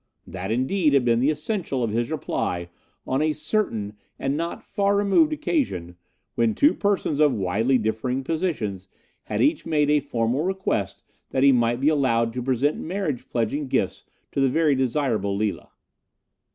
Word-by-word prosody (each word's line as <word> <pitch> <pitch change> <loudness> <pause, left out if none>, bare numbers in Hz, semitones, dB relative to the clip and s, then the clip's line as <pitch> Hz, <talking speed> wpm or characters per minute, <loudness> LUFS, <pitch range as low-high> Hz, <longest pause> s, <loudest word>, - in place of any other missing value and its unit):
That, 95 0 -6
indeed, 140 - +2
had 130 -3 +3
been 115 -1 +3
the 135 +4 +3
essential 155 - -2
of 115 - -1
his 115 +2 -1
reply 85 -1 -2 0.4
on 130 +2 0
a 155 0 +2
certain 150 - -2 0.2
and 135 +1 -1
not 170 +2 -4
far 200 0 0
removed 205 +11 +3
occasion, 250 - -2 0.4
when 115 -2 +1
two 295 - +4
persons 200 -7 0
of 150 -4 +4
widely 110 +7 +1
differing 120 +4 -2
positions 130 - -2 0.4
had - - 0
each 300 +3 +2
made 150 -2 +1
a 150 - +4
formal 125 -1 -1
request 175 - -2 0.3
that 130 - 0
he 140 - +7
might 120 -1 +2
be 140 +3 +3
allowed 115 -6 +1
to 125 - -3
present 130 +3 0
marriage 160 -8 -3
pledging 125 +5 -1
gifts - - -1 0.3
to 140 - -1
the 135 - +4
very 155 +2 +3
desirable 125 -6 0
Lila. 105 0 -2
135 Hz, 165 wpm, -24 LUFS, 115-155 Hz, 0.4 s, he